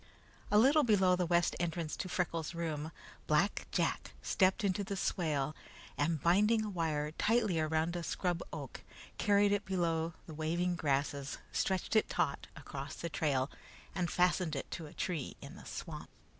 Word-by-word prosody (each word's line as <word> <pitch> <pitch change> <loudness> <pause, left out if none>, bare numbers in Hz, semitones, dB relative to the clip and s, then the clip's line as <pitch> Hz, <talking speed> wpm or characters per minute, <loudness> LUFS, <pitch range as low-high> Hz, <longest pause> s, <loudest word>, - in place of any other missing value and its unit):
A 210 - +4
little 280 +7 +6
below 195 -6 +4
the 180 -1 0
west 170 0 +3
entrance 170 -2 -2
to 185 - -4
Freckles' 170 -3 -1
room, 160 -2 -3 0.4
Black 165 +7 +2
Jack - - -1
stepped 190 +3 +2
into 200 0 +1
the 200 0 -4
swale, 155 -6 0 0.4
and 160 +2 +1
binding 210 +6 +4
a 210 - -4
wire 155 -4 -1
tightly 215 -1 +2
around 160 +2 +1
a 175 - -2
scrub 175 0 -1
oak, - - -7 0.4
carried 205 -1 +4
it 205 0 +1
below 165 -3 0
the 160 - -9
waving 170 +3 0
grasses, 140 -2 -1
stretched 190 +3 0
it 215 - +4
taut 140 -3 -1
across 140 +1 -7
the 170 - -4
trail, 140 -4 0 0.4
and 180 -2 -1
fastened 180 -3 +2
it 135 - -5
to 160 - -5
a - - -12
tree 165 -7 -3
in - - -10
the - - -12
swamp. - - -6
170 Hz, 165 wpm, -34 LUFS, 155-190 Hz, 0.4 s, little